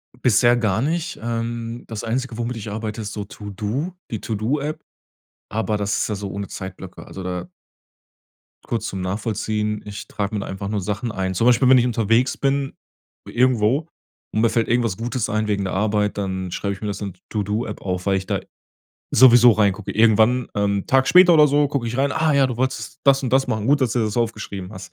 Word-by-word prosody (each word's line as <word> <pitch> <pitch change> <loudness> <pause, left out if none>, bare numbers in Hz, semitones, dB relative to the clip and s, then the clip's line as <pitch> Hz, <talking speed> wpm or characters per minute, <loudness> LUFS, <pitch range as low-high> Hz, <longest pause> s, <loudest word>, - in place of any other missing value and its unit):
Bisher 120 0 +4
gar 110 -3 +1
nicht. 165 +5 -2
Ähm, 115 0 -4
das 110 -2 -6
Einzige, 120 0 -2
womit 120 0 -3
ich 110 -1 -6
arbeite, 110 +1 -4
ist 105 0 -5
so 105 - -4
To-do, 105 - -4 0.2
die 110 - -4
To-do-App, 140 +8 -2 0.7
aber 110 0 -1
das 100 -1 -1
ist - - -1
ja 105 - -1
so 100 0 -5
ohne 100 0 -5
Zeitblöcke. 95 -1 -8
Also 95 - -8
da 90 -1 -4 1.2
kurz 115 - -2
zum 95 - -4
Nachvollziehen, 105 +2 -2
ich 105 0 -8
trag 100 -1 -3
mir 105 - -2
da 100 - -4
einfach 95 +1 -5
nur 105 0 -2
Sachen 105 +5 -3
ein. 95 -2 -2
Zum 115 - +1
Beispiel, 125 +1 +5
wenn 130 - +8
ich 120 - +3
unterwegs 115 +1 +1
bin 140 0 0 0.5
irgendwo 125 +4 +2 0.5
und 110 - +1
mir 115 - +4
fällt 115 0 0
irgendwas 115 -5 +1
Gutes 120 0 -2
ein 110 0 0
wegen 100 -1 0
der 95 - -3
Arbeit, 105 +1 0
dann 95 -2 -3
schreibe 100 +3 -2
ich 95 - -11
mir 105 - -3
das 100 0 -4
in 100 -3 -4
d - - -30
To-do-App 105 +1 -3
auf, 90 -1 -3
weil 100 -1 +2
ich 95 - -4
da 100 -1 -1 0.7
sowieso 120 -1 +7
reingucke. 105 -2 0
Irgendwann, 115 +3 +4
ähm 100 -1 0
Tag 135 0 +3
später 180 -1 +7
oder 150 -2 +7
so 145 0 +2
guck 140 -4 -2
ich 115 +1 -3
rein: 140 +1 +1
„Ah 160 -1 +2
ja, 140 -1 +4
du 125 -3 -4
wolltest 130 +2 -3
das 135 0 +4
und 125 -2 -3
das 135 +1 +3
machen. 110 -1 -2
Gut, 145 +2 +3
dass 125 -4 +1
du - - 0
dir - - +2
das 105 - -4
aufgeschrieben 110 -5 -3
hast.“ 95 - -10
110 Hz, 210 wpm, -22 LUFS, 100-125 Hz, 1.2 s, wenn